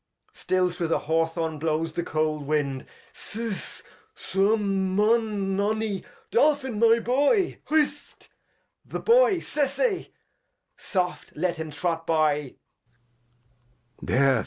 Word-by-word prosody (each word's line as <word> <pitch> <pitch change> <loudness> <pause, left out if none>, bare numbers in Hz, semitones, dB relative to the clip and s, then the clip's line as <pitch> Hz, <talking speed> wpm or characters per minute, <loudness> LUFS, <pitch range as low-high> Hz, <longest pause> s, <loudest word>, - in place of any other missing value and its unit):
— - - -56
Still 185 -1 0
through 175 -1 -3
the 165 - +2
Haw 165 +2 +1
Thorn 165 -2 -4
blows 160 +1 -1
the 175 - -1
cold 155 -3 -1
Wind. 140 -3 -1 0.3
Sess, 225 -2 -6 0.3
Suum, 195 -1 0
Mun, 210 -2 +1
Nonny, 210 0 -1 0.3
Dolphin, 265 -4 +2
my 230 0 +6
Boy! 285 - +1
— - - -28
Hist, 295 -1 -1 0.6
the - - -5
Boy 475 -2 +5
the - - -2
Boy! - - -3
Sesey! 370 - -1 0.7
Soft, 180 -2 -3
let 175 +2 -1
him 160 -1 -5
trot 165 +2 -3
by. 150 -4 +1
190 Hz, 120 wpm, -26 LUFS, 160-230 Hz, 0.7 s, my